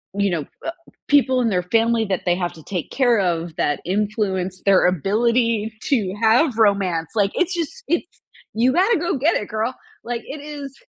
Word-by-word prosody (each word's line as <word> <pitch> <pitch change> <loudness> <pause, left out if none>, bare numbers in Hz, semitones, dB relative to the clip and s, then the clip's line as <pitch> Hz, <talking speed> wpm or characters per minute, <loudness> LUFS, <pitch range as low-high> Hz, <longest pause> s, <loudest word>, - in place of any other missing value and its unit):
You 200 -1 +1
know, 160 -4 -2 0.2
uh, 330 - -1 0.4
people 260 -3 +4
in 235 - +1
their 180 -3 0
family 225 +4 +2
that 190 -3 -1
they 175 -1 +3
have 175 -1 -3
to 160 - -14
take 180 -2 -5
care 245 -5 +3
of 170 -3 -1
that 145 -4 0
influence 190 -1 -1
their 195 -2 +5
ability 220 - +1
to 210 -9 0
have 230 +3 +3
romance, 195 -7 +2
like, 200 -2 +2
it's 360 +1 +1
just 350 +8 -4
it's 345 - 0 0.5
you 240 +4 +3
gotta 390 +7 +3
go 335 -3 -1
get 310 +7 +2
it, 210 - -2
girl, 220 +4 -2 0.3
like, 235 0 -3
it 295 - -7
is 290 -2 -8
220 Hz, 185 wpm, -21 LUFS, 185-260 Hz, 0.5 s, their